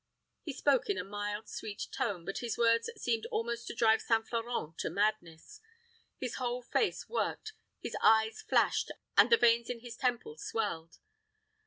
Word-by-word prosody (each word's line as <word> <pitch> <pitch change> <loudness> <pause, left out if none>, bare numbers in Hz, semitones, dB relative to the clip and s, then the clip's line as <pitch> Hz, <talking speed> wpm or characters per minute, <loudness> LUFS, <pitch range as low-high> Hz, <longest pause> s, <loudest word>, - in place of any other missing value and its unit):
He 305 - -5
spoke 275 -1 +2
in 200 - +1
a 180 - -2
mild, 205 +2 -4
sweet 205 -2 -5
tone; 190 -7 -2
but 195 - -3
his 235 -2 -3
words 230 - +3
seemed 230 - -1
almost 235 +1 -3
to - - -5
drive 225 -1 +4
St. 225 -1 +1
Florent 230 -9 -3
to - - -1
madness. 200 -6 -2 0.6
His 250 -2 -4
whole 250 -1 -2
face 435 - 0
worked, 435 -2 -2 0.3
his - - -5
eyes 220 0 +4
flashed, - - +2 0.3
and - - +7
the 460 - +8
veins 235 - +4
in 240 -2 -4
his 240 -1 -8
temple 240 -11 -1
swelled. 165 -7 -3
230 Hz, 165 wpm, -32 LUFS, 205-240 Hz, 0.6 s, the